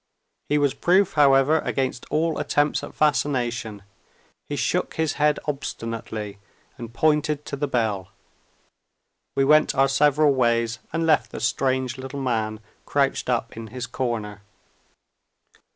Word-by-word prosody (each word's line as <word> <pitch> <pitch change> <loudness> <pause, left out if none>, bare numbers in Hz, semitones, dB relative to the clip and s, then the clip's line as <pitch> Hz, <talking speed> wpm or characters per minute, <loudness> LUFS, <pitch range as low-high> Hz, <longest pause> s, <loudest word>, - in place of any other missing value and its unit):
He 150 - +3
was 145 -2 +2
proof, 185 +2 +2
however, 145 +1 +4
against 130 -4 -2
all 160 +1 0
attempts 145 +1 +1
at - - -9
fascination 125 -7 0 0.7
he - - -2
shook - - -1
his 160 -3 0
head 150 0 +4
obstinately, 115 -7 -5 0.4
and 115 -1 -8
pointed 150 +3 +1
to - - -4
the 145 +1 -2
bell. 110 -8 -1 1.3
We 135 - +3
went 150 +1 +4
our 135 0 +4
several 145 +2 +3
ways, 115 -2 +1
and 165 0 -1
left 155 -2 +3
the - - -7
strange 130 +2 0
little 135 +2 -6
man 110 -4 -2 0.3
crouched 140 -2 0
up 120 -2 -1
in 115 0 -7
his 125 +3 -6
corner. 110 -6 -4
135 Hz, 135 wpm, -24 LUFS, 115-150 Hz, 1.3 s, however